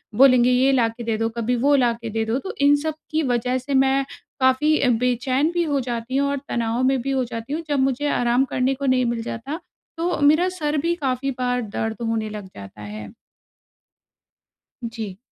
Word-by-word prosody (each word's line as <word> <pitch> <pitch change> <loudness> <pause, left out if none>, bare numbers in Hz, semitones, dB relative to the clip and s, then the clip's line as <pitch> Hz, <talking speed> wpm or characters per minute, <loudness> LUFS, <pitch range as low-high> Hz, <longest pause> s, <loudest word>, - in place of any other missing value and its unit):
बोलेंगे, 255 -1 +6
"ये 260 +2 +4
ला 245 -4 +3
के 235 +1 -9
दे 225 -1 -1
दो, 225 +1 0
कभी 240 +2 0
वो 285 +1 +5
ला 245 -3 +3
के 230 -1 -7
दे 225 +1 -1
दो।" 225 +3 0
तो 385 - -6
इन 285 +1 +6
सब 315 -1 -1 0.2
की 315 0 +1
वजह 250 +2 0
से 265 +2 -5
मैं 270 0 +3 0.3
काफ़ी 265 +4 +3
अ, 255 - +2
बेचैन 250 +5 +1
भी 345 - +1
हो 290 -4 0
जाती 240 0 -4
हूँ 280 0 +2
और 280 - -1
तनाव 235 +1 -1
में 265 +1 +3
भी 275 +3 -2
हो 265 -1 +1
जाती 230 +5 -5
हूँ। 320 - -2
जब 290 -2 +1
मुझे 270 +2 +1
आराम 245 +2 +2
करने 255 +1 +1
को 280 +1 -5
नहीं 255 -1 +3
मिल 235 -1 -1
जाता, 270 +9 -5 0.4
तो 345 +2 -1
मेरा 310 +6 +4
सर 300 0 0
भी 345 - +1
काफ़ी 275 -3 -2
बार 250 0 0
दर्द 220 0 -3
होने 220 -1 -1
लग 210 -2 -7
जाता 100 +1 -11
है। 105 -1 -8 1.8
जी। 220 -5 -6
255 Hz, 210 wpm, -22 LUFS, 230-280 Hz, 1.8 s, बोलेंगे